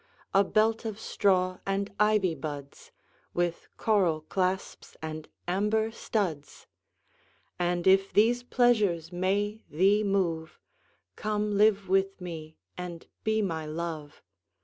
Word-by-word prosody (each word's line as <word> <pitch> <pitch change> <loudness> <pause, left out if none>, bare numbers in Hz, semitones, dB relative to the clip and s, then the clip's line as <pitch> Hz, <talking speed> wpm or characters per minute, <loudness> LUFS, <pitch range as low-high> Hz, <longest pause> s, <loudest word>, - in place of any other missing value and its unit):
A 195 - +6
belt 220 +3 +2
of 220 -2 -4
straw 185 -4 +1
and 200 +1 -2
ivy 210 -4 +3
buds 145 -1 -7 0.4
With 175 -1 -1
coral 185 -8 +2
clasps 185 +4 -2
and 155 0 -6 0.2
amber 210 +4 +1
studs: 175 -11 -3 0.9
And 175 0 0
if 195 +1 +5
these 235 +4 +4
pleasures 215 -10 +2
may 200 +4 0
thee 195 +7 +3
move, 175 -5 -1 0.6
Come 210 -1 -1
live 205 -1 +4
with 195 +1 +1
me 160 -3 -7 0.2
and 175 -2 -7 0.2
be 220 0 +1
my 160 -5 -2
Love. 155 -2 -5
190 Hz, 115 wpm, -29 LUFS, 170-210 Hz, 0.9 s, A